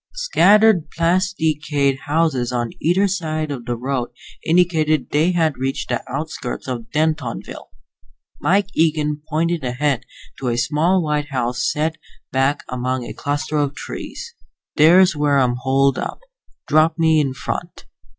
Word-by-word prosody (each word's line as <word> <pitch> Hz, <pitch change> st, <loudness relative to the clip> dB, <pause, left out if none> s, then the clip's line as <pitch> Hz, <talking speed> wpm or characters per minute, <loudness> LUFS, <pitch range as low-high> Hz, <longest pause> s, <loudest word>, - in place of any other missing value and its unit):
Scattered 215 Hz, -, +4 dB
plasticade 160 Hz, -6 st, 0 dB
houses 145 Hz, -5 st, +1 dB
on 120 Hz, -2 st, -2 dB
either 185 Hz, +5 st, +2 dB
side 155 Hz, -5 st, -2 dB
of 125 Hz, -4 st, -6 dB
the 120 Hz, -, -2 dB
road 125 Hz, 0 st, -2 dB, 0.3 s
indicated 160 Hz, -5 st, +2 dB
they 155 Hz, +4 st, +3 dB
had 160 Hz, -6 st, 0 dB
reached 135 Hz, +1 st, -3 dB
the 120 Hz, -, -1 dB
outskirts 140 Hz, -3 st, -5 dB
of 120 Hz, -3 st, -5 dB
Dentonville. 155 Hz, -, -2 dB, 0.7 s
Mike 195 Hz, +2 st, +2 dB
Eagen 150 Hz, -2 st, +1 dB
pointed 165 Hz, 0 st, 0 dB
ahead 130 Hz, 0 st, -1 dB, 0.4 s
to 130 Hz, -, -3 dB
a 120 Hz, -1 st, 0 dB
small 165 Hz, +9 st, +2 dB
white 150 Hz, -1 st, -1 dB
house 125 Hz, -1 st, -1 dB
set 160 Hz, +2 st, -1 dB, 0.3 s
back 135 Hz, +2 st, +1 dB
among 125 Hz, 0 st, -2 dB
a -, -, -7 dB
cluster 145 Hz, +1 st, -2 dB
of 145 Hz, -1 st, 0 dB
trees. 470 Hz, -, -7 dB, 0.4 s
"There's 175 Hz, +3 st, +6 dB
where 145 Hz, -1 st, +2 dB
I'm 125 Hz, -2 st, +2 dB
holed 135 Hz, +1 st, +2 dB
up. -, -, -5 dB, 0.5 s
Drop 155 Hz, +2 st, +3 dB
me 160 Hz, -1 st, +3 dB
off 150 Hz, -, +2 dB
in 130 Hz, -, -4 dB
front." 135 Hz, -, -5 dB
150 Hz, 140 wpm, -20 LUFS, 130-165 Hz, 0.7 s, There's